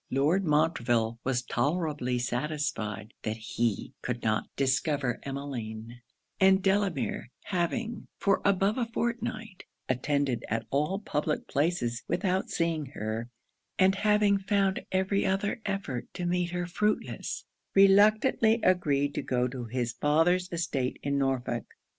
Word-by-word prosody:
Lord 150 +9 +2
Montreville 120 -8 +1
was 125 -1 0
tolerably 145 -1 0
satisfied 120 -5 -2
that 110 +1 -3
he 110 0 -2
could 125 -1 -3
not 110 -1 0
discover 135 -1 +1
Emmeline; 120 -4 -6 0.4
and 190 0 +5
Delamere 195 -10 0
having 205 +6 -2
for 200 -1 +2
above 200 +3 +2
a 235 - 0
fortnight 230 -3 -3 0.2
attended 135 0 0
at 115 +1 -1
all 150 +7 +1
public 150 -6 -2
places 140 -6 0
without 185 +2 0
seeing 165 -4 -1
her, 110 +2 -3 0.5
and 190 0 +5
having 210 0 +3
found 195 0 +1
every 190 +1 +1
other 195 +3 0
effort 195 -11 -3
to 180 - -3
meet 175 0 0
her 175 0 -2
fruitless, 210 +4 -2 0.3
reluctantly 215 +4 +5
agreed 145 -6 +2
to - - -2
go 125 -2 0
to 125 -1 -6
his 120 0 -2
father's 165 +7 +2
estate 140 -7 -1
in 140 0 0
Norfolk. 130 -3 -2
150 Hz, 125 wpm, -29 LUFS, 125-190 Hz, 0.5 s, and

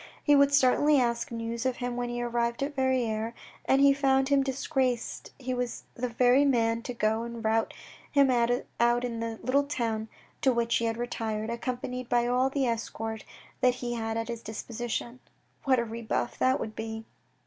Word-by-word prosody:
He 290 - +5
would 280 0 +5
certainly 285 +2 +4
ask 235 -1 0
news 230 0 -3
of 260 -1 0
him 245 -1 -3
when 245 0 -2
he 240 0 -3
arrived 235 +1 -1
at 290 +1 -3
Verrieres, 235 -4 0 0.3
and 270 +1 +4
if - - +7
he 280 - +7
found 270 -1 +2
him 280 -1 +4
disgraced 265 -2 -1
he 255 -1 -3
was 245 -1 -3
the 250 +1 -3
very 250 +3 +4
man 230 -4 +2
to 245 - -5
go 220 0 +1
and 235 -1 -6
route 225 +1 +2 0.4
him 280 -2 +5
out 235 -1 +2 0.6
in 235 -2 -4
the 230 -1 -4
little 280 +3 +2
house 220 -2 -1 0.3
to 270 -4 +4
which 235 -1 +1
he 235 - -1
had 225 0 -1
retired, 225 -2 -3
accompanied 250 +1 -4
by 240 -1 +3
all 250 +2 +2
the 275 -1 0
escort 225 -1 -3 0.4
that 250 -1 +3
he 245 -1 -4
had 225 -1 -2
at 225 0 -2
his 235 -1 -4
dis 220 -1 -6
position. 240 +1 -4 0.5
What 265 -2 +4
a 235 - 0
rebuff 230 +1 -3
that 260 +1 +3
would 215 0 -5
be 220 0 -5
240 Hz, 190 wpm, -28 LUFS, 230-260 Hz, 0.6 s, if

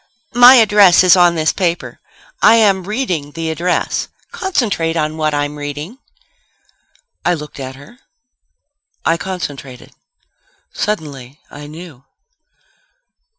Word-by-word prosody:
"My 245 +2 +8
address 205 -6 +5
is 185 0 +6
on 175 -1 +4
this 155 -1 0
paper. 175 -3 -3 0.4
I 225 - +6
am 200 -5 +2
reading 185 - -3
the 165 -1 -4
address. 175 +3 -2 0.2
Concentrate 240 - -2
on 155 0 -2
what 155 -1 -1
I'm 145 0 -3
reading." 145 - -7 1.2
I 175 - +1
looked 150 -2 -10
at 130 -1 -7
her. 215 - -16 1.1
I 165 - +2
concentrated. 145 -9 -7 0.8
Suddenly, 145 -9 -5
I 145 0 -10
knew. 155 -4 -12
165 Hz, 110 wpm, -16 LUFS, 150-200 Hz, 1.2 s, My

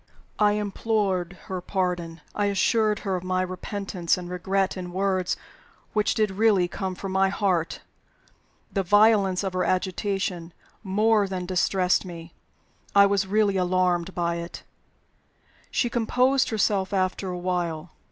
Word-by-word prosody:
I 210 -1 +4
implored 205 -3 -1
her 185 -1 -5
pardon; 175 -3 -2
I 205 - 0
assured 210 +2 +2
her 190 -1 0
of 180 - -4
my 185 0 0
repentance 185 -1 -2
and 180 -1 -7
regret 190 +2 0
in 180 -2 -6
words 185 -1 0 0.6
which 210 -1 +1
did 215 -2 +1
really 200 -3 +3
come 190 +1 -4
from 195 +1 -6
my 190 0 +3
heart. 190 -4 0 0.9
The 195 - +1
violence 205 -1 +4
of 190 -1 -2
her 185 0 0
agitation 185 -1 -1 0.3
more 210 +1 +2
than 185 -1 -4
distressed 185 0 +1
me 170 -2 -9 0.6
I 200 0 +8
was 200 -1 +1
really 205 -1 +2
alarmed 180 -1 +1
by 170 -1 0
it. 170 0 -7 1.1
She 245 - +1
composed 250 +3 +2
herself 200 -3 0
after 190 0 0
a 180 - -4
while. 175 -3 -2
190 Hz, 140 wpm, -25 LUFS, 180-205 Hz, 1.1 s, I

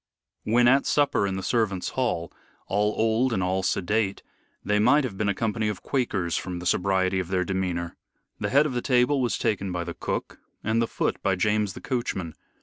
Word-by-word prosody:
When 120 +2 +4
at 135 +3 +4
supper 145 -8 +2
in 95 - -2
the 95 - -4
servants' 105 -6 0
hall 120 -10 -2 0.3
all 105 +2 0
old 115 +3 +2
and 95 - 0
all 95 +1 0
sedate 100 +2 0 0.4
they 105 0 +2
might 145 +8 +4
have 125 -7 -4
been 100 +1 0
a 100 - 0
company 110 0 -1
of 105 -3 -4
Quakers 100 - -1
from 90 -1 -3
the 90 - -7
sobriety 95 +1 +1
of 90 - -3
their 90 0 0
demeanor. 90 -2 -2 0.4
The - - -1
head 140 +3 +4
of 145 - -2
the 120 - -1
table 130 +2 +2
was 120 - 0
taken 100 -4 -1
by 90 -1 -2
the 85 0 -5
cook, - - -4 0.2
and 110 +2 +1
the 115 - +1
foot - - -2
by 95 - +1
James 105 +1 +1
the - - -10
coachman. 95 - -3
105 Hz, 205 wpm, -26 LUFS, 95-120 Hz, 0.4 s, When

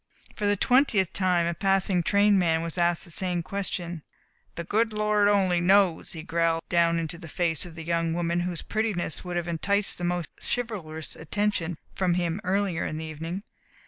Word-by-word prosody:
For 210 - -1
the 205 0 +2
twentieth 215 - +3
time 180 -3 +2
a 170 - 0
passing 195 0 +2
train 200 +2 +4
man 165 -2 +2
was 165 -1 -4
asked 175 -1 +1
the 170 - -9
same 175 0 -1
question. 175 -2 -4 0.5
"The 170 - -4
good 220 +5 +1
Lord 210 -1 +2
only 190 -4 +3
knows," 190 -2 +3
he 160 -2 -7
growled 165 0 0
down 170 -1 +3
into 165 +1 -3
the 170 - -9
face 170 +1 -1
of 165 - -12
the 165 - -7
young 165 0 0
woman 170 0 0
whose 175 -1 -3
prettiness 215 -8 -2
would 180 -1 -3
have 175 0 -2
enticed 195 +5 0
the - - -5
most 175 -1 -1
chivalrous 180 -10 -4
attention 175 -1 -1 0.2
from 180 -2 +1
him 175 +2 -1
earlier 195 -2 0
in 155 - -3
the 160 - -5
evening. 165 +5 -5
175 Hz, 185 wpm, -27 LUFS, 165-200 Hz, 0.5 s, train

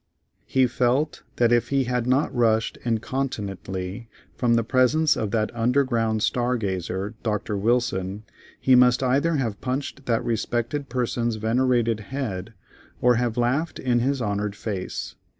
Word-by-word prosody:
He 130 -1 +3
felt 125 +5 0
that 120 -1 +3
if 120 -1 +2
he 140 -1 +2
had 125 -1 -1
not 130 +3 +2
rushed 115 -2 +2
incontinently 110 -4 -3 0.3
from 120 -2 +2
the 115 - +2
presence 130 +6 +3
of 110 - -2
that 110 +2 -1
underground 115 -3 +1
star 125 0 +1
gazer 95 0 -3
Dr. 105 -1 -2
Wilson, 100 -2 0 0.4
he 130 - +3
must 125 0 +5
either 140 +6 +2
have 115 -7 -2
punched 135 +1 -4
that 115 -2 +1
respected 120 +5 -2
person's 120 -2 -1
venerated 115 0 +1
head, 110 -4 -5 0.4
or 125 -1 +4
have 120 -1 -1
laughed 140 +7 0
in 125 -2 +1
his 130 +1 0
honored 105 -1 -2
face. 100 -4 -4
120 Hz, 140 wpm, -24 LUFS, 110-130 Hz, 0.4 s, must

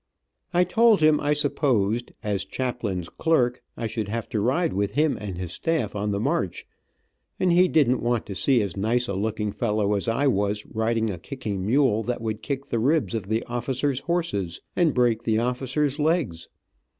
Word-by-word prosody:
I 180 0 +4
told 220 +4 +4
him 155 -1 +4
I 145 0 +1
supposed, 120 -6 +1
as 100 -2 -1
chaplain's 115 -9 -3
clerk. 125 - +1 0.2
I 115 - -3
should 110 -1 -3
have 115 +1 -3
to 110 - -1
ride 135 - +1
with 100 +1 -1
him 150 +2 +2
and 100 -4 -5
his 90 -2 -5
staff 150 - -1
on 105 0 -1
the 100 -1 -1
march, 100 -4 -1 0.7
and 185 - +3
he 180 +1 +5
didn't 130 -7 +3
want 120 -1 0
to 100 - -6
see 115 +5 +2
as 95 -4 -4
nice 120 +5 0
a 100 - -2
looking 105 +1 -2
fellow 105 -2 0
as 100 +1 -1
I 115 +5 +1
was 105 -4 +1
riding 110 0 0
a 90 - -6
kicking 105 - -5
mule 120 0 +3
that 120 +2 -2
would 110 -1 -3
kick 140 +1 -3
the 115 - -2
ribs 145 +3 +1
of 110 -4 -3
the 110 +2 0
officers 130 +3 -1
horses, 160 - -2 0.2
and 170 -5 +2
break 120 -3 +2
the 110 -2 +1
officers 130 +5 0
legs. 150 - 0
120 Hz, 185 wpm, -25 LUFS, 105-140 Hz, 0.7 s, he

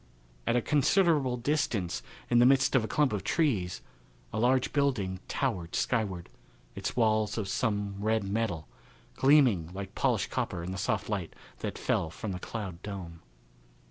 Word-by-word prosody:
At - - +3
a 120 - +2
considerable 150 -3 +3
distance, 120 - -1 0.3
in 120 - +4
the 120 - +7
midst 135 0 +4
of 130 - +4
a - - -2
clump 145 +2 +2
of 100 -3 -2
trees, 105 - 0 0.5
a - - -1
large 125 +2 +2
building 110 -11 0
towered 95 -11 -2
skyward, 100 -8 -1 0.5
its - - -4
walls 110 -3 +2
of 105 -3 -2
some 100 -1 -1
red 110 0 +1
metal, 100 -5 -2 0.5
gleaming 130 - +4
like 100 0 -6
polished - - 0
copper 85 - -2
in 90 - -4
the 95 - -4
soft 105 +1 -1
light 100 -6 -3 0.2
that - - -4
fell 80 - 0
from 100 +6 -5
the 90 - -4
cloud 95 -4 -6
dome. 90 -5 -7
110 Hz, 160 wpm, -30 LUFS, 95-130 Hz, 0.5 s, the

